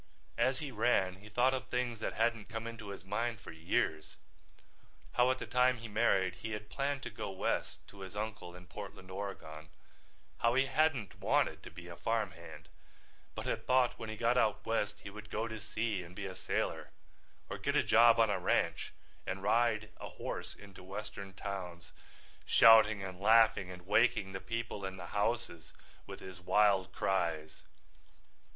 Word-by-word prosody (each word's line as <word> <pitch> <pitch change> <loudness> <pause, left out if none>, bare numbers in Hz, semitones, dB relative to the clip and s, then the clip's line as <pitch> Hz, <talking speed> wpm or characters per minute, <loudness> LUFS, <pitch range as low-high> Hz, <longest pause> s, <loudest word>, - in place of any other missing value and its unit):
As 130 +2 +3
he 145 -1 -5
ran 100 -5 +2
he 105 +3 -13
thought 125 +5 +3
of 130 - -3
things 125 -2 -2
that - - -2
hadn't 115 -1 0
come 110 0 -5
into 115 -2 -7
his 100 -2 -8
mind 115 +4 -2
for - - -10
years—how 80 +8 -3
at 130 - +2
the - - -5
time 125 0 +3
he 115 +1 -8
married 100 -5 +2
he 110 -1 -4
had 105 0 -7
planned 140 0 -1
to - - -5
go - - -5
west 95 -1 -2
to 100 - -14
his 95 +1 -8
uncle 105 -4 -5
in 90 0 -12
Portland, 95 0 -9
Oregon—how 80 - -5
he 135 +1 +4
hadn't 140 - 0
wanted - - +1
to - - -10
be 90 0 -11
a 85 - -8
farm 105 +2 -1
hand, 85 -1 -12 0.7
but - - -5
had - - -3
thought 130 -1 +3
when 115 -1 -5
he 110 - -5
got 120 +2 +3
out 110 -3 +1
West 105 -2 -1
he 100 - -8
would 105 +1 -10
go 110 +2 -2
to 110 -1 -6
sea 110 -2 -2
and 90 +1 -12
be 100 - -5
a 95 -1 -6
sailor - - -2 0.6
or - - -6
get - - -1
a - - +4
job 115 0 +6
on 115 -2 +4
a - - 0
ranch - - 0 0.3
and 95 +1 -3
ride 110 0 +2
a - - -7
horse - - -6
into 100 -2 -13
Western 100 +1 -7
towns, 90 -5 -6 0.5
shouting 110 -3 +7
and 95 -1 -7
laughing 110 -2 +5
and 90 -1 -10
waking 105 -1 +3
the 95 - -4
people 115 -3 -4
in 95 0 -4
the 90 - -7
houses 105 -6 -2 0.3
with - - -8
his 95 -1 -9
wild 95 0 +3
cries. 85 -6 -1
105 Hz, 180 wpm, -33 LUFS, 95-115 Hz, 0.7 s, shouting